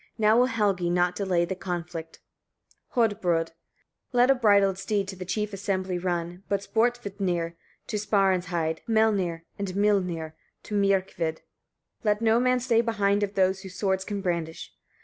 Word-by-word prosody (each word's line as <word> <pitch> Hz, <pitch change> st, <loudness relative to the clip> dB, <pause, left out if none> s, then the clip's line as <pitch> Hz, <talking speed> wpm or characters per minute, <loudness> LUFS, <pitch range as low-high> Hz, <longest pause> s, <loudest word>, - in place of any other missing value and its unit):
Now 215 Hz, -1 st, +4 dB
will 250 Hz, +2 st, +5 dB
Helgi 200 Hz, -7 st, +1 dB
not 175 Hz, 0 st, +2 dB
delay 185 Hz, -4 st, +1 dB
the 190 Hz, -, -3 dB
conflict." 175 Hz, -3 st, -6 dB, 0.7 s
Hodbrodd. 185 Hz, -8 st, +1 dB
50. -, -, -30 dB, 0.6 s
"Let 245 Hz, +2 st, +5 dB
a -, -, +7 dB
bridled 200 Hz, -6 st, +3 dB
steed 200 Hz, -1 st, -1 dB
to 195 Hz, -, -6 dB
the 185 Hz, 0 st, -7 dB
chief 210 Hz, +3 st, -2 dB
assembly 190 Hz, -2 st, -2 dB
run, 175 Hz, 0 st, -3 dB
but 200 Hz, -1 st, +1 dB
Sporvitnir 200 Hz, -8 st, -1 dB, 0.3 s
to 215 Hz, -, -3 dB
Sparinsheid; 180 Hz, -6 st, +1 dB
Melnir 200 Hz, -7 st, +2 dB, 0.2 s
and 200 Hz, -, -2 dB
Mylnir 180 Hz, -6 st, +1 dB, 0.3 s
to -, -, -8 dB
Myrkvid; 190 Hz, -5 st, 0 dB, 0.6 s
let 210 Hz, -1 st, +2 dB
no 225 Hz, 0 st, +3 dB
man 255 Hz, 0 st, +2 dB
stay 235 Hz, -2 st, +3 dB
behind 205 Hz, -3 st, +1 dB
of 205 Hz, 0 st, -2 dB
those 190 Hz, 0 st, +2 dB
who 190 Hz, -, -8 dB
swords 190 Hz, 0 st, -1 dB
can 200 Hz, 0 st, -4 dB
brandish. 170 Hz, -3 st, -3 dB
195 Hz, 150 wpm, -26 LUFS, 175-210 Hz, 0.7 s, a